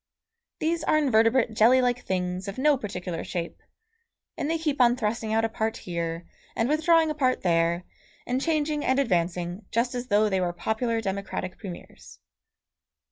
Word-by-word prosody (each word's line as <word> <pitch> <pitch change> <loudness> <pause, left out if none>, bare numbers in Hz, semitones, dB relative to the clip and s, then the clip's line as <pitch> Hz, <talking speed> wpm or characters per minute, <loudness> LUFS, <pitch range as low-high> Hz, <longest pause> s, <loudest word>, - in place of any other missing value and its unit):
These 330 +1 -1
are 310 - +3
invertebrate 230 -4 +3
jelly 230 +4 +5
like 245 -1 0
things 180 +1 -2
of 200 - -6
no 295 +2 +4
particular 180 -7 -5
shape, 170 -2 -5 0.7
and 290 - -3
they 330 - +1
keep 300 -4 -1
on 240 0 +5
thrusting 220 -2 -2
out 225 +1 +2
a - - +2
part 220 0 -2
here, 170 -1 -4 0.3
and 225 - +1
withdrawing 320 +2 +3
a - - -1
part 260 -4 0
there, 170 0 +2 0.4
and 255 +2 -1
changing 305 -1 0
and 260 - +2
advancing 180 -5 0
just 235 +2 0
as 245 0 -4
though 210 0 +3
they 190 -2 0
were 175 -1 -1
popular 225 +5 -1
democratic 195 -2 -4
premiers. 185 -5 -10
225 Hz, 165 wpm, -26 LUFS, 185-260 Hz, 0.7 s, jelly